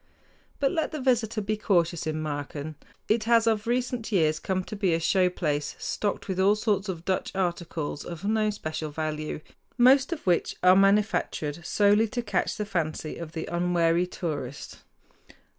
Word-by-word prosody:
But 275 Hz, -1 st, +2 dB
let 320 Hz, -3 st, -1 dB
the 310 Hz, -, -4 dB
visitor 235 Hz, -4 st, +1 dB
be 210 Hz, +1 st, -1 dB
cautious 170 Hz, -6 st, +1 dB
in 155 Hz, 0 st, -2 dB
Marken. 145 Hz, 0 st, -4 dB, 0.3 s
It 215 Hz, 0 st, +1 dB
has 230 Hz, -1 st, +4 dB
of 220 Hz, -1 st, +1 dB
recent 245 Hz, -1 st, -1 dB
years 155 Hz, -5 st, +2 dB
come 185 Hz, +2 st, -1 dB
to 215 Hz, -, -7 dB
be 190 Hz, -5 st, +1 dB
a -, -, 0 dB
show 180 Hz, +2 st, +3 dB
place, 150 Hz, -5 st, -2 dB
stocked 205 Hz, -1 st, -3 dB
with 190 Hz, -1 st, -2 dB
all 200 Hz, +2 st, +5 dB
sorts 210 Hz, -2 st, 0 dB
of 175 Hz, -2 st, -5 dB
Dutch 190 Hz, -1 st, -1 dB
articles 170 Hz, -5 st, -2 dB
of 175 Hz, +2 st, -7 dB
no 215 Hz, 0 st, +2 dB
special 155 Hz, -6 st, -4 dB
value, 155 Hz, 0 st, -4 dB, 0.4 s
most 260 Hz, +3 st, +5 dB
of 335 Hz, -, -4 dB
which 175 Hz, -2 st, +1 dB
are 180 Hz, 0 st, +7 dB
manufactured 195 Hz, -5 st, +1 dB
solely 205 Hz, +5 st, +3 dB
to 240 Hz, +2 st, -3 dB
catch 210 Hz, -, -1 dB
the 210 Hz, -, -2 dB
fancy 160 Hz, -5 st, -3 dB
of 165 Hz, -2 st, -7 dB
the 160 Hz, -, -4 dB
unwary 175 Hz, 0 st, +1 dB
tourist. 145 Hz, -7 st, -5 dB
185 Hz, 170 wpm, -27 LUFS, 160-215 Hz, 0.4 s, are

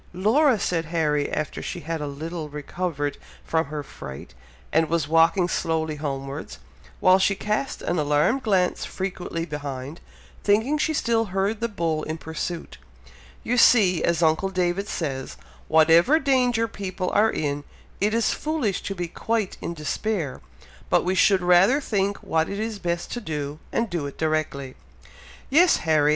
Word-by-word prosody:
"Laura!" 235 Hz, -, +4 dB
said 165 Hz, -3 st, -1 dB
Harry, 155 Hz, -3 st, 0 dB
after 155 Hz, -, -3 dB
she -, -, -5 dB
had 160 Hz, +1 st, -4 dB
a 150 Hz, -, -3 dB
little 155 Hz, +2 st, -5 dB
recovered 145 Hz, 0 st, -3 dB, 0.3 s
from 160 Hz, 0 st, +1 dB
her 150 Hz, 0 st, -5 dB
fright, 65 Hz, -, -10 dB, 0.4 s
and 160 Hz, 0 st, +3 dB
was 165 Hz, -3 st, 0 dB
walking 165 Hz, +3 st, +4 dB
slowly 160 Hz, -3 st, -1 dB
homewards, 140 Hz, 0 st, -5 dB, 0.4 s
while 185 Hz, 0 st, +5 dB
she 195 Hz, +1 st, +2 dB
cast 210 Hz, +7 st, -2 dB
an 175 Hz, -1 st, 0 dB
alarmed 150 Hz, -, +2 dB
glance 190 Hz, -6 st, +1 dB
frequently 180 Hz, -3 st, -4 dB
behind, 145 Hz, -1 st, -6 dB, 0.4 s
thinking 220 Hz, +8 st, +3 dB
she 315 Hz, -, +1 dB
still 230 Hz, -6 st, +1 dB
heard 195 Hz, +2 st, -1 dB
the 235 Hz, -, 0 dB
bull 165 Hz, -7 st, -1 dB
in 155 Hz, +1 st, -4 dB
pursuit, 160 Hz, -, -5 dB, 0.6 s
"you 245 Hz, +2 st, 0 dB
see, 195 Hz, -8 st, +5 dB
as 170 Hz, 0 st, +1 dB
uncle 160 Hz, +4 st, +2 dB
David 185 Hz, +1 st, -1 dB
says, 135 Hz, -, -4 dB, 0.3 s
whatever 165 Hz, -, +5 dB
danger 250 Hz, -5 st, +2 dB
people 190 Hz, -4 st, -4 dB
are 220 Hz, +1 st, +4 dB
in, 145 Hz, -5 st, -2 dB, 0.4 s
it 205 Hz, +2 st, +2 dB
is 230 Hz, -, +2 dB
foolish 300 Hz, -, -1 dB
to 195 Hz, -, -4 dB
be 175 Hz, -1 st, -3 dB
quite 220 Hz, +3 st, -2 dB
in 170 Hz, -, -4 dB
despair, 160 Hz, -1 st, -2 dB, 0.5 s
but -, -, +3 dB
we 185 Hz, -, +1 dB
should 190 Hz, -1 st, +4 dB
rather 180 Hz, +10 st, +5 dB
think 200 Hz, -7 st, -1 dB
what 160 Hz, 0 st, 0 dB
it 200 Hz, -, -4 dB
is 220 Hz, -1 st, -3 dB
best 175 Hz, -1 st, -3 dB
to 240 Hz, -, -4 dB
do, 150 Hz, -4 st, -4 dB
and 230 Hz, -, 0 dB
do 165 Hz, -5 st, -2 dB
it 140 Hz, -, -9 dB
directly." 155 Hz, -4 st, -1 dB, 0.8 s
"Yes, 340 Hz, +5 st, +6 dB
Harry! 155 Hz, -2 st, +4 dB
175 Hz, 160 wpm, -24 LUFS, 155-205 Hz, 0.8 s, Yes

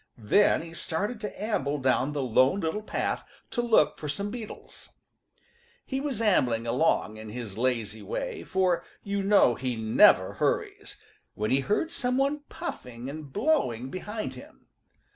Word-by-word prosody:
Then 125 Hz, -, +3 dB
he 165 Hz, 0 st, -10 dB
started 205 Hz, +8 st, -2 dB
to 210 Hz, -, -6 dB
amble 150 Hz, -10 st, 0 dB
down 130 Hz, +1 st, +1 dB
the 145 Hz, -2 st, -1 dB
Lone 130 Hz, -, +3 dB
Little 165 Hz, +6 st, -1 dB
Path 215 Hz, -, -2 dB, 0.3 s
to 240 Hz, -, 0 dB
look 225 Hz, -11 st, +3 dB
for 150 Hz, -, -5 dB
some 200 Hz, +7 st, -3 dB
beetles. 230 Hz, -2 st, -9 dB, 1.0 s
He 265 Hz, 0 st, -2 dB
was 275 Hz, -6 st, -2 dB
ambling 125 Hz, -, +2 dB
along 120 Hz, -3 st, +1 dB
in 110 Hz, 0 st, -8 dB
his 110 Hz, -3 st, -6 dB
lazy 115 Hz, -3 st, -1 dB
way, -, -, -4 dB
for 185 Hz, -2 st, +1 dB, 0.2 s
you 200 Hz, 0 st, -1 dB
know 200 Hz, -10 st, +5 dB
he 125 Hz, 0 st, -3 dB
never 110 Hz, 0 st, +5 dB
hurries, -, -, -2 dB, 0.4 s
when 105 Hz, +1 st, -1 dB
he 135 Hz, -, +4 dB
heard 210 Hz, -, 0 dB
some 250 Hz, -6 st, 0 dB
one 280 Hz, +2 st, +1 dB
puffing 125 Hz, +2 st, -6 dB
and 150 Hz, -2 st, -8 dB
blowing 135 Hz, -, 0 dB
behind 210 Hz, +4 st, -4 dB
him. -, -, -14 dB
160 Hz, 155 wpm, -28 LUFS, -, 1.0 s, know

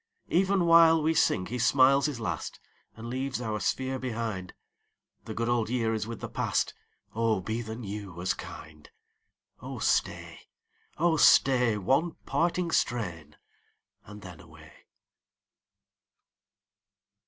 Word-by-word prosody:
37 170 Hz, -, +3 dB
Even 195 Hz, -2 st, +1 dB
while 165 Hz, -1 st, +6 dB
we 160 Hz, +1 st, +2 dB
sing 95 Hz, -11 st, +2 dB
he 125 Hz, +5 st, -5 dB
smiles 135 Hz, +3 st, +4 dB
his 140 Hz, -5 st, -5 dB
last 110 Hz, -, -4 dB, 0.4 s
And 115 Hz, +1 st, -9 dB
leaves 130 Hz, +1 st, -3 dB
our 110 Hz, -3 st, -3 dB
sphere 130 Hz, +4 st, -2 dB
behind. 110 Hz, -7 st, -4 dB, 0.7 s
The -, -, -7 dB
good 115 Hz, 0 st, -2 dB
old 120 Hz, -2 st, 0 dB
year 115 Hz, -2 st, 0 dB
is 110 Hz, -1 st, -3 dB
with 115 Hz, -1 st, -7 dB
the -, -, -4 dB
past; -, -, -1 dB, 0.4 s
Oh 115 Hz, -2 st, +1 dB
be 110 Hz, +5 st, -3 dB
the 110 Hz, -1 st, -6 dB
new 100 Hz, -5 st, -7 dB
as 90 Hz, -, 0 dB
kind! 75 Hz, -1 st, -11 dB, 0.7 s
Oh -, -, -7 dB
staj, -, -, -1 dB, 0.6 s
oh 165 Hz, 0 st, +2 dB
stay, 125 Hz, -6 st, +5 dB
One 135 Hz, -, +1 dB
parting 170 Hz, 0 st, 0 dB
strain, 85 Hz, -, -2 dB, 0.7 s
and 105 Hz, 0 st, -12 dB
then 90 Hz, -4 st, -10 dB
away. 80 Hz, -1 st, -16 dB
115 Hz, 130 wpm, -28 LUFS, 105-135 Hz, 0.7 s, while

